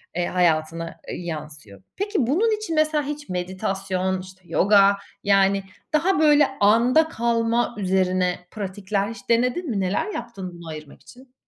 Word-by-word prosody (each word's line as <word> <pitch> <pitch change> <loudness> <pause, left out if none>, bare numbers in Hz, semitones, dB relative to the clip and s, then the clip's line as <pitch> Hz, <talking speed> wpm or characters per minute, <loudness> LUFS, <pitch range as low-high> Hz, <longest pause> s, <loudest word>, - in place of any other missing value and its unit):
eee, 175 0 0
hayatına, 165 -1 0
eee, - - -5
yansıyor. 150 - -8 0.2
Peki 400 - 0
bunun 430 - +2
için 420 -6 -4
mesela 310 -1 +2
hiç 295 -2 -6
meditasyon, 185 +1 -2
işte, 185 0 -13
yoga, 200 +2 +4 0.3
yani, 195 -1 +3 0.3
daha 340 +3 +2
böyle 295 -2 +5
anda 235 +9 +4
kalma 235 0 0
üzerine 185 -2 +1 0.2
pratikler 200 0 -3
hiç 230 - -11
denedin 250 +8 +1
mi, 210 -5 -1
neler 195 - -1
yaptın 190 -6 -6
bunu 170 -1 -11
ayırmak 155 -2 -9
için? 255 +1 -17
200 Hz, 140 wpm, -23 LUFS, 185-255 Hz, 0.3 s, böyle